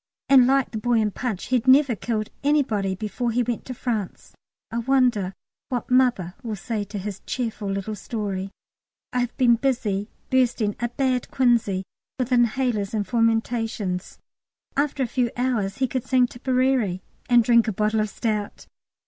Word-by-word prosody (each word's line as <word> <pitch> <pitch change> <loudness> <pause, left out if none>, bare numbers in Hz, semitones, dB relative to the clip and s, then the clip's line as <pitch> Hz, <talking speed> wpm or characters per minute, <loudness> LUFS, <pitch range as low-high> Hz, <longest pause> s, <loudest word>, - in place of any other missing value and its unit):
And 260 -3 +7
like 270 0 +2
the 220 - -3
boy 240 +3 0
in 215 -1 +1
'Punch,' 215 -4 -3
he'd 255 -1 +1
never 265 -2 +6
killed 215 0 -3
anybody 225 -10 +1
before 220 +4 -3
he 240 +2 +1
went 240 -1 -3
to 255 - -6
France. 220 -6 -4 0.4
I 230 - -1
wonder 240 -7 +2 0.3
what 250 -2 -3
"Mother" 245 -9 +3
will 225 -4 -4
say 210 +1 -3
to 205 +1 -7
his 195 0 -5
cheerful 225 -5 -3
little 195 +2 -3
story. 200 -2 -4 0.6
I 250 - +1
have 245 -1 -2
been 240 -2 +5
busy 225 -6 -1 0.2
bursting 240 -5 +2
a 240 +1 -1
bad 255 0 -1
quinsy 235 -7 +2 0.3
with 255 -1 -2
inhalers 240 -4 +1
and 210 -1 0
fomentations. 225 -4 -1 0.6
After 280 -1 0
a 240 - -5
few 250 -2 +2
hours 230 -6 0
he 265 - +1
could 255 -1 -3
sing 255 -1 +4
Tipperary 250 -6 0 0.3
and 240 -1 +6
drink 235 0 +4
a - - +1
bottle 215 +2 0
of 215 0 0
stout! 210 -1 -3
235 Hz, 165 wpm, -24 LUFS, 210-255 Hz, 0.6 s, And